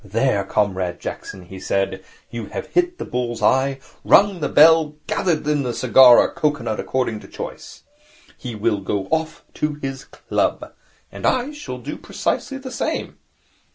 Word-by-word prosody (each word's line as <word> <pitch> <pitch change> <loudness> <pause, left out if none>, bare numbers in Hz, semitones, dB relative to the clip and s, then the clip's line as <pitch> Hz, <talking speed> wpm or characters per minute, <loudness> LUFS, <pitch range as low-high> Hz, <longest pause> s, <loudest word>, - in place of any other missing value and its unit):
'There, 105 +1 +1
Comrade 95 -3 -1
Jackson,' 95 - -7
he 95 +1 -10
said, 95 +1 -1 0.3
'you 115 -3 -5
have - - -5
hit 355 0 +1
the - - -5
bull's 120 -2 -3
eye, 135 +1 +3 0.3
rung 200 -2 +5
the 150 - -1
bell, 160 +2 +7
and 150 -1 -7
gathered 165 -5 0
in 150 -1 +2
the 125 -3 -3
cigar 125 0 +7
or - - +3
cocoanut 145 -7 -1
according 125 -4 -1
to - - -13
choice. - - -9 0.5
He 120 -3 -7
will 105 -1 0
go 95 0 -2
off 160 0 -1
to 150 -1 -2
his 135 -2 -6
club. - - -2 0.4
And - - -3
I 255 +3 +1
shall 295 0 -7
do - - -7
precisely 270 - -3
the 265 -1 -8
same.' - - -3
130 Hz, 165 wpm, -21 LUFS, 110-160 Hz, 0.5 s, bell